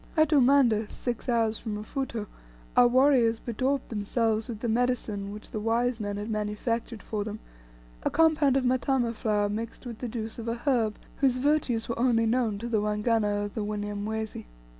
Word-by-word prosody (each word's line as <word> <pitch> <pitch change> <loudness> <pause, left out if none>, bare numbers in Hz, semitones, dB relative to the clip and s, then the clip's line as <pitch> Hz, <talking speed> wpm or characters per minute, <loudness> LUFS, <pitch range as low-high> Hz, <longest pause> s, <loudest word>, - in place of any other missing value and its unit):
At 310 -1 +5
Umanda, 255 -6 +4
six 245 +1 -4
hours 225 -2 +1
from 220 -3 -4
Mfuto, 225 0 -4 0.5
our 245 - +7
warriors 250 -2 +4
bedaubed 255 +5 -2
themselves 220 +1 0
with 225 -2 -6
the 240 - -1
medicine 225 -4 0
which 210 +1 -10
the 215 - -3
wise 230 +2 +1
men 205 -1 -3
had 205 +1 -4
manufactured 215 +2 -2
for 210 -2 -3
them 215 +1 -6 0.6
a - - 0
compound 310 -4 +4
of 265 - 0
matama 250 -1 +1
flour 210 -2 0
mixed 225 +5 -5
with 235 -3 -7
the 250 - -3
juices 225 0 -5
of 230 - -6
a 230 - 0
herb 235 -4 0 0.2
whose 265 -3 +2
virtues 270 -4 +1
were 235 - -3
only 235 -2 +3
known 225 -2 +1
to 230 +4 -5
the 220 -3 +1
Waganga 210 -1 +1
of 205 - -7
the 220 - -2
Wanyamwezi. 210 +1 -4
230 Hz, 180 wpm, -28 LUFS, 215-250 Hz, 0.6 s, our